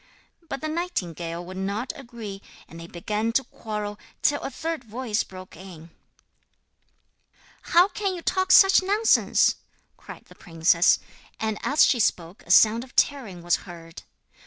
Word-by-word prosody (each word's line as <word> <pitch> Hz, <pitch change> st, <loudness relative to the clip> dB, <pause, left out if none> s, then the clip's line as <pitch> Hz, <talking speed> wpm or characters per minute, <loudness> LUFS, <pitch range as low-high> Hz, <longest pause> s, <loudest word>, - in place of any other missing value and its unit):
But 275 Hz, -, -5 dB
the 310 Hz, -, -3 dB
nightingale 175 Hz, -, -4 dB
would 185 Hz, +1 st, -9 dB
not 200 Hz, +6 st, -3 dB
agree; 230 Hz, -7 st, -9 dB, 0.3 s
and 165 Hz, -, -12 dB
they 165 Hz, -, -9 dB
began 210 Hz, +6 st, -3 dB
to 270 Hz, -, +2 dB
quarrel, 210 Hz, -3 st, -6 dB, 0.2 s
till 290 Hz, -, +2 dB
a -, -, -4 dB
third 320 Hz, +2 st, -5 dB
voice 225 Hz, -1 st, -2 dB
broke 185 Hz, 0 st, -12 dB
in: 170 Hz, -2 st, -12 dB, 1.7 s
'How 350 Hz, +2 st, +4 dB
can 400 Hz, -2 st, -3 dB
you 345 Hz, -, -8 dB
talk 375 Hz, 0 st, 0 dB
such 385 Hz, 0 st, +7 dB
nonsense?' 410 Hz, +4 st, +2 dB, 0.4 s
cried -, -, -12 dB
the -, -, -17 dB
princess 170 Hz, +1 st, +2 dB, 0.4 s
and 220 Hz, -1 st, -2 dB
as 290 Hz, +2 st, +4 dB
she 245 Hz, -, +2 dB
spoke 175 Hz, -3 st, -1 dB
a -, -, -17 dB
sound 225 Hz, +2 st, +5 dB
of 255 Hz, -, -17 dB
tearing 220 Hz, -12 st, 0 dB
was 175 Hz, 0 st, +2 dB
heard. 165 Hz, -1 st, -11 dB
215 Hz, 150 wpm, -24 LUFS, 175-285 Hz, 1.7 s, such